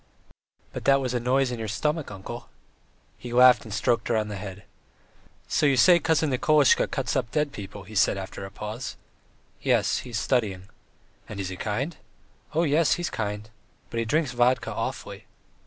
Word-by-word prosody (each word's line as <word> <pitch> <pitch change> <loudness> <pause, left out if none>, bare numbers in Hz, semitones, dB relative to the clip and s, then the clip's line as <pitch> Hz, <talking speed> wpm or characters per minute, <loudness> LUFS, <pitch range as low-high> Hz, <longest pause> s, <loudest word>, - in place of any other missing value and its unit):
"But - - -6
that 140 0 +5
was 130 -2 -2
a 125 - +1
noise 130 +2 +1
in 120 - -4
your 110 - -3
stomach, 150 +9 -1
uncle." 95 -2 -8 0.7
He 120 - -8
laughed 125 0 +6
and 110 - -9
stroked 115 +2 0
her 115 - +1
on 105 -1 -1
the 105 - -5
head. 95 0 -8 0.8
"So 150 - +2
you 135 -2 +3
say 175 +5 +7
Cousin 160 -3 +1
Nikolasha 145 +2 +4
cuts - - -2
up - - 0
dead 150 -2 0
people?" 100 -5 -8
he 105 +3 -13
asked 100 - +4
after 95 0 -5
a 95 - -6
pause. 110 +5 -6 0.6
"Yes, - - +2
he - - -9
is 115 - -3
studying." 100 -6 -1 0.6
"And 105 - -6
is 95 -2 -3
he 95 - -5
kind?" 125 - -3 0.6
"Oh, 165 - +3
yes, 155 0 +3
he's 175 0 -2
kind. 105 0 -4 0.4
But 115 - -2
he 115 - 0
drinks 150 +1 +1
vodka 125 +1 +2
awfully." - - -5
120 Hz, 185 wpm, -26 LUFS, 105-140 Hz, 0.8 s, say